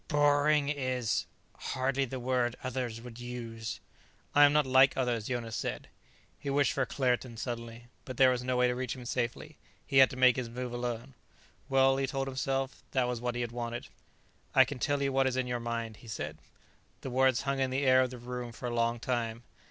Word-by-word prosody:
"Boring 145 0 +3
is 130 -5 -1 0.3
hardly 135 +1 -1
the 130 +1 -5
word 125 -1 0
others 125 -3 -3
would 120 0 -10
use." 115 -2 -6 0.5
"I 145 0 +8
am 145 - +5
not 150 -1 +4
like 130 +1 +5
others," 120 -4 0
Jonas 120 -3 -3
said. - - -4 0.5
He 140 - -5
wished 140 -1 +2
for 135 -2 0
Claerten 125 -3 -1
suddenly, 115 0 -5 0.2
but 130 -2 -8
there 130 -1 +6
was 125 -1 -1
no 125 0 0
way 125 - +4
to 125 - +1
reach 125 -1 -3
him 125 -2 -9
safely. 125 +5 -3 0.3
He 135 -2 +3
had 130 - +8
to - - -7
make 130 -2 +5
his 125 -2 -3
move 125 +1 -5
alone. 120 +1 -4 0.6
Well, 135 0 +4
he 135 0 0
told 135 +1 -2
himself, 135 0 -2
that 130 -2 +2
was 125 -2 -3
what 120 0 -2
he 120 - -1
had 120 -1 -3
wanted. 120 0 -5 0.7
"I - - +8
can 145 - -6
tell 145 +2 0
you 135 -1 0
what 135 0 +3
is 130 -1 -1
in 130 - +1
your 125 -1 -2
mind," 115 -2 -4
he 120 - -15
said. 75 -7 -5 0.6
The 130 - -5
words 130 -1 +3
hung 140 0 -1
in 130 -1 +1
the 135 +2 -1
air 130 0 +6
of 130 - +1
the 125 - -8
room 120 0 -6
for 125 - -8
a 120 - -2
long 115 0 +1
time. 115 -2 -2
125 Hz, 215 wpm, -31 LUFS, 120-135 Hz, 0.7 s, I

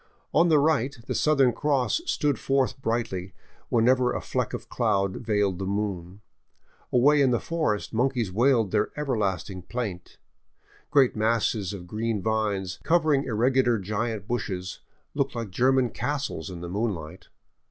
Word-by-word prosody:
On 170 +2 +4
the 155 - +5
right 140 -3 +1
the - - -3
Southern 140 -5 +3
Cross 145 - 0
stood 145 -2 0
forth 135 -1 0
brightly 100 -7 -2 0.3
whenever 125 +2 +3
a - - -2
fleck - - -2
of - - -6
cloud 100 -5 0
veiled 105 -4 0
the 95 - -3
moon. 100 -2 -3 0.7
Away 145 +4 +5
in 135 - +4
the 120 - +2
forest 155 -13 -2
monkeys 120 -3 0
wailed 115 -1 +2
their 105 -1 +1
ever 150 -4 -1
lasting 95 -2 -2
plaint. 95 -3 -5 0.7
Great 140 -4 +4
masses 110 -3 0
of 95 -4 -7
green 110 +3 -2
vines, 100 -3 -1
covering 155 -4 +2
irregular 120 +1 +2
giant 105 +1 -3
tushes, 95 -6 -3 0.3
looked - - -1
like 115 -4 -4
German 130 +4 +2
castles 140 -7 -3
in 90 -2 -8
the 85 - -5
moonlight. 95 -6 -4
115 Hz, 145 wpm, -26 LUFS, 100-130 Hz, 0.7 s, the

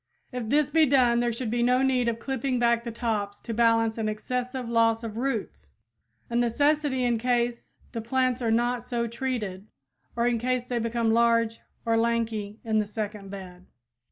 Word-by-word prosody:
If 245 -4 -4
this 290 +2 +2
be 320 -1 +5
done 245 -3 +4
there 240 0 +1
should 230 -1 -4
be 240 0 0
no 250 +2 +3
need 255 -2 +2
of 230 -1 0
clipping 265 +1 -2
back 235 -1 +2
the 235 - -5
tops 210 -3 -2
to 230 - -5
balance 225 0 +2
an 215 -1 0
excessive 250 +3 -3
loss 230 0 +2
of 220 -2 -5
roots, 270 +4 -3 0.5
a 235 - -5
necessity 270 +3 +2
in 240 -2 +1
case 240 0 -1 0.2
the 230 - -4
plants 255 +2 0
are 230 - 0
not 240 +2 +1
so 240 -1 -2
treated, 230 -5 -4 0.5
or 235 0 +1
in 240 -1 +1
case 255 +1 0
they 245 -1 -2
become 230 0 0
large 230 -1 +3 0.3
or 230 0 +2
lanky 225 -3 -1
in 220 -1 +1
the 210 - -1
second 210 -2 -5
bed. 185 -2 -10
235 Hz, 185 wpm, -27 LUFS, 225-250 Hz, 0.5 s, be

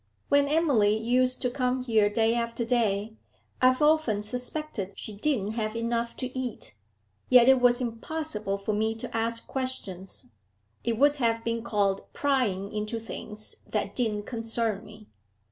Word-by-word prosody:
When 285 0 +4
Emily 275 -10 +3
used 250 +3 +1
to 250 - +1
come 255 0 0
here 220 -4 +3
day 225 +2 +2
after 235 0 -1
day, 220 -3 0 0.4
I've 255 +2 +4
often 295 -9 +3
suspected 250 -3 -4
she 215 - -6
didn't 215 -2 0
have 220 -1 -2
enough 230 0 -1
to 255 0 -5
eat, 255 - -4 0.6
yet 250 -1 +7
it 265 -1 +6
was 245 +1 +4
impossible 230 -3 -3
for 200 +2 -2
me 220 +2 0
to 225 - -7
ask 230 0 -1
questions, 195 - -5 0.5
it 230 -1 0
would 290 +3 +4
have 230 -3 +1
been 230 0 -1
called 205 -4 0
prying 230 -9 0
into 215 +2 -2
things 215 -1 -7
that - - -2
didn't 215 -4 0
concern 225 -2 -2
me.' 215 0 -13
230 Hz, 150 wpm, -27 LUFS, 215-255 Hz, 0.6 s, yet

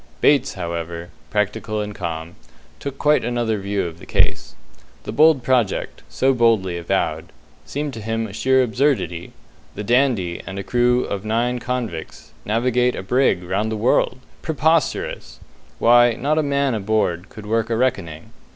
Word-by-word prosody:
Bates, 145 -1 +3
however 85 -1 -5 0.2
practical 105 +3 -1
and 105 0 -4
calm 80 -2 -5 0.5
took 140 -1 -6
quite 150 +1 +3
another 120 -2 -1
view 100 +1 -1
of 85 0 -7
the - - -13
case. - - 0 0.5
The - - -5
bold 155 -4 +5
project, 120 -6 0
so 135 +1 +2
boldly 115 -7 +2
avowed, 85 -1 -2 0.4
seemed 145 0 -3
to 115 - -7
him 115 +1 -2
a 100 - -8
sheer 130 +4 +3
absurdity. 120 - 0 0.4
The 105 - -5
"Dandy" 120 -7 +1
and 95 +1 -6
a 100 - -3
crew 125 +2 +2
of 100 -1 -4
nine 120 +3 0
convicts 120 -10 -5
navigate 125 +3 +1
a - - -5
brig 125 -4 +2
round 100 +5 -1
the 110 - -2
world! 120 +2 +2 0.2
Preposterous; 160 -1 0 0.4
why, 120 0 +5
not 145 +7 0
a - - +4
man 140 -2 +1
aboard 105 -3 -1
could 110 -3 -11
work 115 +1 0
a 115 - 0
reckoning! 85 -11 -2
115 Hz, 155 wpm, -21 LUFS, 95-125 Hz, 0.5 s, bold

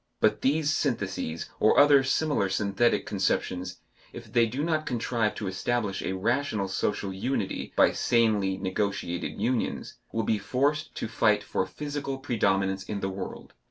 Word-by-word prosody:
But - - +2
these 155 +2 +2
syntheses 95 - -2
or 110 - +5
other 145 -1 +7
similar 135 -6 +1
synthetic 100 +4 +1
conceptions, 90 -2 -1 0.3
if - - -10
they 115 -1 +4
do 130 +6 -3
not 155 -1 0
contrive 115 -2 0
to 105 - -5
establish 100 +2 -1
a - - -2
rational 110 +1 0
social 95 0 -1
unity 100 +1 -2
by - - +5
sanely 105 -5 +2
negotiated 95 -2 -2
unions, 120 +3 -2
will 115 - -1
be 105 +1 +1
forced 140 +8 0
to - - -3
fight - - +2
for - - -1
physical 145 -2 -4
predominance 100 -7 0
in 100 0 -5
the 95 - -1
world. 95 0 -7
110 Hz, 150 wpm, -27 LUFS, 95-135 Hz, 0.3 s, other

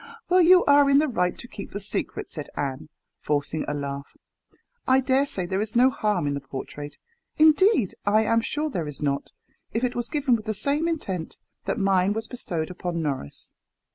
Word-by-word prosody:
"Well, 365 0 +5
you 360 +1 +6
are 285 0 +6
in 275 - +6
the 305 +2 +4
right 180 -9 0
to 240 - -10
keep 200 -4 -8
the 205 - -3
secret," 200 - -4
said 150 -3 -7
Anne, 140 +2 -3 0.3
forcing 150 +1 -1
a 145 - -2
laugh. 140 0 -6 0.7
"I 260 0 +5
dare 265 +2 +2
say 185 -9 -2
there 190 +3 -1
is 215 +2 -4
no 255 +2 +5
harm 210 - 0
in 145 - 0
the 140 - -2
portrait 140 +2 -8 0.4
indeed, 310 - +5
I 215 +2 +3
am 230 +1 +2
sure 300 +5 -2
there 170 - -3
is 150 - -8
not, 140 -1 -2 0.4
if 225 - -1
it 250 -1 0
was 240 - -3
given 280 -5 +2
with 215 -2 -5
the 215 -1 -2
same 290 +9 0
intent 190 - -3 0.3
that - - -1
mine 195 -1 +2
was 225 +1 -3
bestowed 175 -10 -4
upon 175 -2 -3
Norris. 135 - -5
205 Hz, 200 wpm, -25 LUFS, -, 0.7 s, you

